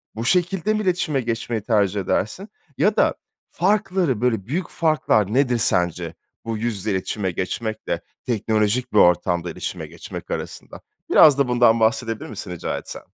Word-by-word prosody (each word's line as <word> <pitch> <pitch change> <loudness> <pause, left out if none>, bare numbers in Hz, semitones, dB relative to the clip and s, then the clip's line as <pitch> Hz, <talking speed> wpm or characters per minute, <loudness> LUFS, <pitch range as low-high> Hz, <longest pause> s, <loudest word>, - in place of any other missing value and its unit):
Bu 115 +1 -4
şekilde 180 - +1
mi 215 - 0
iletişime 175 -7 0
geçmeyi 115 -1 -2
tercih 105 -3 +1
edersin? 180 - -2 0.3
Ya 210 0 +2
da - - +4 0.4
farkları, 185 - +1
böyle, 115 -6 0
büyük 165 - -3
farklar 130 - +1
nedir, 125 -2 +2
sence, 85 -5 0 0.3
bu 115 -1 -2
yüz 115 +1 -2
yüze 100 +3 -3
iletişime 95 0 -2
geçmekle 110 +5 -3 0.2
teknolojik 110 +2 0
bir - - +2
ortamda 90 0 +3
iletişime - - -5
geçmek - - -9
arasında? - - -6 0.3
Biraz 145 -3 +7
da 140 - +2
bundan 120 -2 +4
bahsedebilir 110 0 0
misin 100 -3 -7
rica 90 - -3
etsem? - - -8
115 Hz, 150 wpm, -22 LUFS, 105-145 Hz, 0.4 s, Biraz